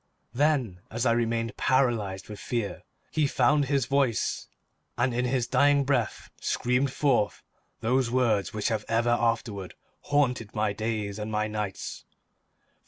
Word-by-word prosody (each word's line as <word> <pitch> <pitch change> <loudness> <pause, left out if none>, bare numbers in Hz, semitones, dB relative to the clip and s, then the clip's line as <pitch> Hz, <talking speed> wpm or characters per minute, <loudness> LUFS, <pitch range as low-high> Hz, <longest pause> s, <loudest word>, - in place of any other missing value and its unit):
Then, 130 - +1
as 115 +2 -2
I 120 - +4
remained, 115 -1 0
paralyzed 115 -8 +1
with 105 -2 -8
fear, 115 -5 -3 0.3
he 155 -2 +2
found 140 +3 +3
his 135 -2 +1
voice 135 -4 0 0.5
and 120 +1 +1
in 125 +1 0
his 125 -1 +1
dying 140 +3 +4
breath 130 -6 -1
screamed 125 +2 +1
forth 130 -8 +1 0.4
those 125 +1 +2
words 115 -7 +1
which 105 -1 -1
have 110 -2 -1
ever 115 +1 +2
afterward 115 -5 -1 0.3
haunted 125 -7 +1
my 105 -1 +1
days 110 -1 -3
and 105 +1 -4
my 105 0 0
nights. 105 -2 -4
120 Hz, 140 wpm, -27 LUFS, 105-130 Hz, 0.5 s, I